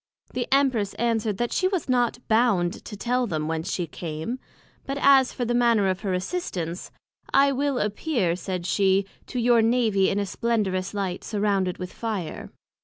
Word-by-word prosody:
The 245 - -2
Empress 260 -7 +2
answered, 225 -3 0
That 240 +2 -1
she 370 - +2
was 375 -4 -2
not 245 -1 0
bound 220 -6 +2
to 210 - -7
tell 245 +3 0
them 155 -5 -2
whence 160 +1 -2
she 175 - -1
came; 160 - -5 0.5
but 275 +1 -2
as 270 -2 +5
for 245 - -3
the 240 - 0
manner 235 -4 +3
of 185 0 -1
her 195 -2 -3
assistance, 180 - -4 0.4
I 275 0 +5
will 275 0 0
appear, 210 - 0
said 180 -1 -4
she, 195 0 +2 0.2
to - - -6
your 240 -1 +4
Navy 225 -4 +3
in 195 - -1
a 205 - 0
splendorous 195 -3 -1
Light, 190 -3 -2
surrounded 200 -4 0
with 180 -1 -7
Fire. 210 -9 -4
215 Hz, 175 wpm, -25 LUFS, 185-245 Hz, 0.5 s, as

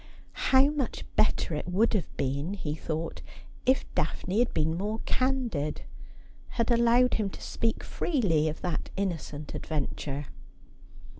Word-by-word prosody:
How 270 +2 +6
much 280 -6 -2
better 215 - +2
it 150 - -3
would 205 +7 +3
have 195 -8 -2
been, 140 +8 -1
he 150 -7 -3
thought, 160 +1 -3 0.5
if 260 +1 +4
Daphne 180 +6 0
had 245 - +3
been 160 +1 +1
more 210 +5 -1
candid, 245 - 0 0.7
had 235 +1 +2
allowed 235 +1 +5
him 210 -3 +1
to - - -10
speak 225 -1 -1
freely 190 - +1
of 155 - -6
that 175 -3 -2
innocent 160 -6 -3
adventure 145 -1 -3
190 Hz, 135 wpm, -29 LUFS, 155-235 Hz, 0.7 s, How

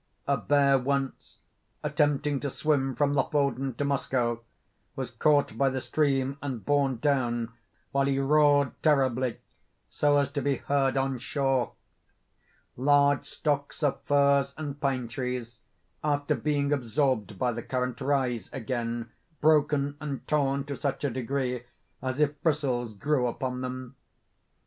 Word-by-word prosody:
A 140 - +2
bear 140 +2 +3
once, 135 +1 -2 0.5
attempting 145 -1 +1
to 140 - -2
swim 135 -2 0
from 140 +3 +2
Lofoden 135 -2 0
to 145 - -1
Moskoe, 125 -4 0 0.5
was - - -4
caught 145 -6 +2
by 135 - +4
the 130 0 -2
stream 135 -1 0
and 130 -6 -5
borne 140 -3 +2
down, 120 -4 0 0.4
while 140 -1 +2
he 135 -1 +1
roared 145 0 +4
terribly, 130 -5 +2 0.5
so 145 -1 +3
as 140 -1 +1
to 145 -1 -2
be 140 -1 +1
heard 135 -1 0
on 135 -1 0
shore. 135 -2 0 1.0
Large 145 +1 +3
stocks 145 0 -2
of 145 - +1
firs 140 -1 +3
and 145 -2 -5
pine 130 -4 0
trees, 125 -2 -4 0.4
after 145 -1 +1
being 145 -1 0
absorbed 125 -6 0
by 125 +3 +1
the 120 0 -4
current, 125 +1 -3
rise 130 -6 0
again 115 -1 -3 0.3
broken 145 -2 +3
and 145 -3 -5
torn 140 -2 +1
to 140 0 -5
such 140 0 -3
a 140 - +1
degree 125 0 -2 0.4
as 130 +1 -3
if 150 -1 +1
bristles 130 -8 0
grew 130 +3 +1
upon 125 +1 -3
them. 130 -1 -6
135 Hz, 140 wpm, -28 LUFS, 125-145 Hz, 1.0 s, by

